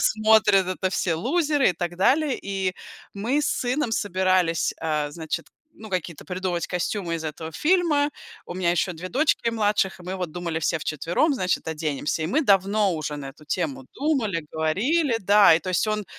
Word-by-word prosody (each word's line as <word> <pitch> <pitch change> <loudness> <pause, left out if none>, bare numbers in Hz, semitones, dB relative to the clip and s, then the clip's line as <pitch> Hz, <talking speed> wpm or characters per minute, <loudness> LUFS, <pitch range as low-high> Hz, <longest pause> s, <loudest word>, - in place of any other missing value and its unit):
смотрит- 215 -3 +4
это 185 0 -2
все 175 -3 0
лузеры 290 - +2
и - - -2
так 175 +1 -4
далее. 275 - +2
И 190 -2 -2 0.4
мы 235 +9 0
с - - 0
сыном 250 +1 -1
собирались, 185 -5 +1
э, 150 -2 -1
значит, 160 +1 -5 0.3
ну, 220 - -11
какие-то 175 -5 -4
придумывать 180 -2 -2
костюмы 180 0 -2
из 165 -1 -5
этого 160 +1 -5
фильма. 300 - +2 0.3
У - - -7
меня 175 -1 +1
еще 180 +1 0
2 175 +3 -7
дочки 255 -1 +1
младших, 205 -4 0
и - - -11
мы 185 +2 -5
вот 180 -3 -4
думали 170 -1 -3
все 160 +1 0
вчетвером, 165 - 0
значит, 185 -9 -1
оденемся. 155 -1 -2
И - - -1
мы 300 - +1
давно 200 -2 +3
уже 150 -2 -4
на 135 -2 -7
эту 150 +2 -19
тему 150 -6 -3
думали, 240 - 0
говорили, 230 - +1
да. 205 -3 +6
И 165 - +1
то 185 - -4
есть 185 - +1
он, 215 -1 -1
185 Hz, 180 wpm, -24 LUFS, 165-220 Hz, 0.4 s, да